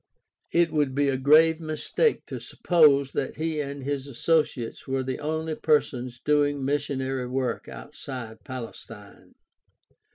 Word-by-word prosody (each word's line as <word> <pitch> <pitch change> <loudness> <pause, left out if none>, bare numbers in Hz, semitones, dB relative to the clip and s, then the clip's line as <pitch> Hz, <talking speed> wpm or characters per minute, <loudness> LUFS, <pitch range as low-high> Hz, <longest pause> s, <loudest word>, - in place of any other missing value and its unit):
It 170 -1 +3
would 145 -4 0
be 145 0 +2
a 135 - +1
grave 155 +4 +5
mistake 160 - 0
to - - -6
suppose 145 -6 +3
that 135 - -3
he 160 0 -2
and 140 -1 -6
his 140 0 -3
associates 140 -3 0
were 135 0 -1
the 130 0 -3
only 160 +1 -2
persons 130 -6 0
doing 145 -1 +1
missionary 135 -2 -1
work 125 -2 -2
outside 115 -5 -8
Palestine. 115 -4 -10
140 Hz, 130 wpm, -26 LUFS, 130-155 Hz, -, grave